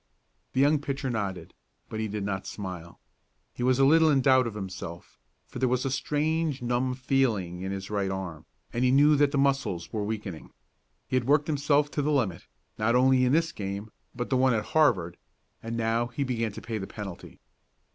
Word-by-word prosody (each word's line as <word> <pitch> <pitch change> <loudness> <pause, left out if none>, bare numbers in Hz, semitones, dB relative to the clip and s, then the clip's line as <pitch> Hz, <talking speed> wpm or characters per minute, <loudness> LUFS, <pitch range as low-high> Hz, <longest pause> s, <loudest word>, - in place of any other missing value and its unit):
The 130 - 0
young 145 +2 +4
pitcher 140 -2 -3
nodded, 95 -7 -4 0.3
but 110 - -5
he 110 - -1
did 105 -1 -4
not 95 -1 -3
smile. 90 -4 -7 0.5
He - - -8
was 125 0 +3
a 135 - +5
little 160 +2 +6
in 140 -3 +4
doubt 130 -2 +4
of 110 - -6
himself, 95 -4 -7 0.3
for - - -8
there 130 0 +2
was 125 +1 0
a 135 - 0
strange 150 +2 0
numb 125 +1 0
feeling 115 -10 0
in 95 +1 -3
his 100 +1 -5
right 100 -2 0
arm, 90 -5 -5 0.3
and 120 - 0
he 130 - +4
knew 145 +3 +5
that 145 0 +3
the 140 - 0
muscles 135 -11 0
were 105 -2 -1
weakening. 105 -5 -5 0.6
He 130 - +1
had 125 - 0
worked 145 +1 +4
himself 145 -1 +1
to 145 - -1
the 150 +2 0
limit, 110 - 0 0.3
not 110 +3 +2
only 130 0 +4
in 125 - +2
this 165 +2 +2
game, 100 +1 -5 0.2
but 120 +1 -4
the 130 - +3
one 130 0 +4
with 105 -1 -1
Harvard, 100 - +2 0.4
and 115 +1 -4
now 115 +1 +1
he 120 +4 -3
began 115 -4 -1
to - - -9
pay 115 -2 -3
the 95 - -5
penalty. 100 -4 -8
120 Hz, 205 wpm, -27 LUFS, 100-135 Hz, 0.6 s, little